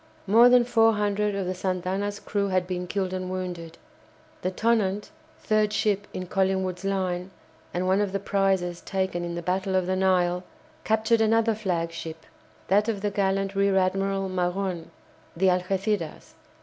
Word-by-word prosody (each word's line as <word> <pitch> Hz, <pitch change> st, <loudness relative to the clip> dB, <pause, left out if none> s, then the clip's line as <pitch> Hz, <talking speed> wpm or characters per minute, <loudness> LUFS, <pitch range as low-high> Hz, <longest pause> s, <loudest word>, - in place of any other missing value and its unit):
More 230 Hz, +5 st, +7 dB
than 245 Hz, 0 st, +6 dB
four 225 Hz, -2 st, +4 dB
hundred 210 Hz, 0 st, 0 dB
of 195 Hz, -1 st, -2 dB
the 185 Hz, -, -1 dB
"Santa 185 Hz, -1 st, -2 dB
Ana's" 200 Hz, +2 st, -2 dB
crew 200 Hz, -1 st, -1 dB
had 185 Hz, -1 st, +1 dB
been 180 Hz, 0 st, -4 dB
killed 190 Hz, -1 st, -2 dB
and 185 Hz, 0 st, -3 dB
wounded. 175 Hz, -3 st, -5 dB, 0.6 s
The 185 Hz, -, 0 dB
"Tonnant," 210 Hz, -1 st, 0 dB, 0.3 s
third 215 Hz, -1 st, +1 dB
ship 205 Hz, -1 st, 0 dB
in 185 Hz, -, -5 dB
Collingwood's 190 Hz, 0 st, 0 dB
line, 185 Hz, -2 st, -1 dB, 0.4 s
and 180 Hz, +1 st, -2 dB
one 190 Hz, +2 st, +3 dB
of 205 Hz, -2 st, -1 dB
the 195 Hz, -, -1 dB
prizes 190 Hz, -3 st, 0 dB
taken 190 Hz, -2 st, -2 dB
in 170 Hz, 0 st, -4 dB
the 170 Hz, -, -5 dB
Battle 190 Hz, +2 st, -1 dB
of 185 Hz, -1 st, +2 dB
the 185 Hz, +1 st, 0 dB
Nile, 180 Hz, -1 st, +2 dB, 0.4 s
captured 220 Hz, +1 st, +2 dB
another 225 Hz, +1 st, +3 dB
flagship, 165 Hz, -5 st, -4 dB, 0.4 s
that 205 Hz, +3 st, +3 dB
of 205 Hz, -3 st, -2 dB
the 205 Hz, 0 st, -1 dB
gallant 195 Hz, 0 st, 0 dB
Rear 195 Hz, 0 st, +2 dB
Admiral 195 Hz, +1 st, +1 dB
Magon, 180 Hz, -1 st, -2 dB, 0.5 s
the 190 Hz, +2 st, +4 dB
"Algéciras." 185 Hz, -1 st, -2 dB
190 Hz, 160 wpm, -26 LUFS, 180-205 Hz, 0.6 s, More